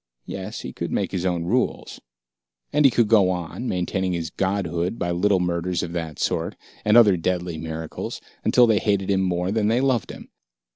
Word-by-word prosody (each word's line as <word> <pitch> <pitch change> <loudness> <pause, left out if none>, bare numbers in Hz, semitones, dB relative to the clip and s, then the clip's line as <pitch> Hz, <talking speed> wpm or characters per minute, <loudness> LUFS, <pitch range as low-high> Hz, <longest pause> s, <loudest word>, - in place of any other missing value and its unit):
Yes, - - -6
he - - -7
could - - -4
make - - -1
his 95 0 -1
own 85 -2 -1
rules. 85 - -1 0.7
And 150 0 +4
he - - +9
could 120 -2 +2
go 105 -4 +5
on, 90 +7 -4
maintaining 95 0 -1
his 85 -1 -3
godhood 95 0 -1
by 85 - -1
little 95 +2 +2
murders 90 0 -1
of 85 - -4
that 80 -3 -4
sort, - - -1 0.3
and 105 +2 +5
other 105 -6 +7
deadly 90 -1 -2
miracles, 80 0 -5 0.2
until 125 - +5
they 110 -3 +3
hated 100 -2 0
him 95 -1 +2
more 90 0 0
than 105 -1 +1
they 115 +3 +2
loved 130 -6 +1
him. - - -10
90 Hz, 190 wpm, -23 LUFS, 85-105 Hz, 0.7 s, he